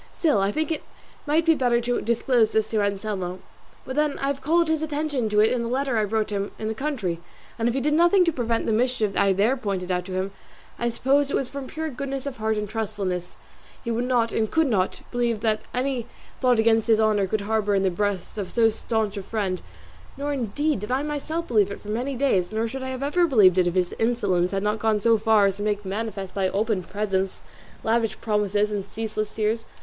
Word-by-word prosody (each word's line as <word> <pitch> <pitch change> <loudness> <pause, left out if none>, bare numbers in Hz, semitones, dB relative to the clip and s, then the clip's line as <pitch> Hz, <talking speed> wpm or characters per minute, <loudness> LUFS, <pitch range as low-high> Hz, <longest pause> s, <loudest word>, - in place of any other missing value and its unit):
Still, 300 - +2
I 195 +1 +1
think 315 +7 -1
it 315 - -1 0.5
might 315 +3 +2
be 325 - +6
better 245 -5 +2
to 245 +1 -1
disclose 235 0 +2
this 220 0 +1
to 220 -2 +2
Anselmo. 200 -3 -2 0.5
But 260 - -5
then 300 -1 +1
I - - -3
have 280 -1 -3
called 335 +3 +3
his 315 -1 +1
attention 295 -6 -1
to 210 0 +4
it 220 - +4
in 250 - 0
the 235 - -2
letter 265 0 0
I 215 - +2
wrote 215 +1 -1
to 205 - -3
him 200 +1 -3
in 215 - -4
the 220 - -1
country, 220 - -2 0.4
and, 230 - +1
if 240 - -2
he 270 - 0
did 300 +3 +1
nothing 345 +4 +5
to 335 - +2
prevent 235 -4 -1
the - - 0
mischief 225 -3 +1
I 200 - +4
there 205 +7 +2
pointed 195 -7 -3
out 180 0 -1
to 190 - -6
him, 190 +1 -2 0.5
I 240 - +1
suppose 275 +4 +2
it - - 0
was 260 - -1
that - - -22
from 275 -2 -5
pure 320 +2 -4
goodness 275 +1 -4
of 280 -2 -5
heart 220 0 0
and 210 0 -2
trustfulness 200 -5 -3 0.5
he 235 - -2
would 235 +2 0
not 240 -2 +2
and 220 -1 0
could 320 0 +2
not 195 -8 0
believe 235 -3 0
that 215 -1 +1
any 250 -2 -1 0.3
thought 250 -2 +3
against 225 0 +3
his 220 -1 +4
honour 210 -3 +3
could 215 +2 -1
harbour 210 -1 +1
in 195 - +2
the 190 - +2
breast 205 +2 -2
of 190 -3 -4
so 225 -2 +3
stanch 220 -2 -2
a - - -2
friend; 195 -2 -2 0.6
nor 285 +1 -2
indeed 275 +2 -1
did 210 +4 -6
I 265 +3 +1
myself 310 +3 -3
believe 210 -4 +3
it 200 - -6
for 210 - -10
many 250 +6 -2
days, 225 -9 +1
nor 220 +1 0
should 265 +4 -6
I 260 - -4
have 260 +1 -4
ever 340 +5 +2
believed 195 - +5
it 180 - +3
if 175 - -1
his 180 -1 +1
insolence 200 -7 +1
had 195 0 -2
not 210 +1 0
gone 220 -1 +2
so 225 +1 +3
far 220 -1 +4
as 195 -1 0
to - - -6
make 210 -1 0
it - - -23
manifest 195 -1 -4
by 190 -2 +1
open 210 0 0
presents, 195 0 -2 0.4
lavish 225 -1 0
promises, 210 -1 +1
and 205 -2 -2
ceaseless 215 0 -4
tears. 220 +1 -1
220 Hz, 240 wpm, -24 LUFS, 205-260 Hz, 0.6 s, be